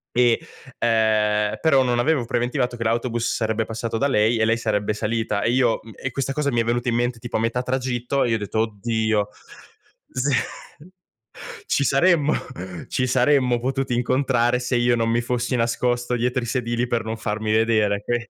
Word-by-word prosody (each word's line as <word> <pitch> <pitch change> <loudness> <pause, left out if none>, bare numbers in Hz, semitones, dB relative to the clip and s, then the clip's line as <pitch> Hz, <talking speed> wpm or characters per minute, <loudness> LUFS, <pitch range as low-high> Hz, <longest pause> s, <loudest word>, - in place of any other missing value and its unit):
e 120 -2 +4 0.4
ehm, 110 -2 +2
però 140 -5 +4
non 120 -1 0
avevo 140 -1 +1
preventivato 125 +1 -1
che 115 - -3
l'autobus 115 +1 0
sarebbe 110 -1 -1
passato 115 0 -4
da 140 +4 +1
lei 110 -2 +2
e 110 - +2
lei 115 +1 +2
sarebbe 105 -2 -1
salita, 110 -1 -1
e 115 - +2
io 125 -2 +2
mhmm, 110 0 -12
e 135 - -5
questa 135 +1 -2
cosa 140 -1 0
mi 120 - +2
è - - 0
venuta 120 +1 0
in 115 - 0
mente 120 0 -1
tipo 120 -1 -3
a - - -1
metà 115 +2 0
tragitto 125 +1 -1
e 120 - 0
io 115 - +2
ho - - -2
detto: 105 +1 -3
"Oddio!" 110 -1 0 0.8
Sì. 135 +3 -1 1.4
Ci 140 - +1
saremmo 150 +3 +3 0.6
ci 130 - 0
saremmo 125 -1 +3
potuti 130 0 -2
incontrare, 125 0 +1
se 125 0 -1
io 120 0 +3
non 115 0 0
mi 120 +1 +2
fossi 120 +1 -2
nascosto 120 +1 0
dietro 125 +2 0
i 120 - -4
sedili 120 0 -1
per 120 -2 -1
non 110 0 -3
farmi 110 0 -2
vedere, 110 -2 +2
qui 120 - 0
120 Hz, 185 wpm, -22 LUFS, 110-125 Hz, 1.4 s, e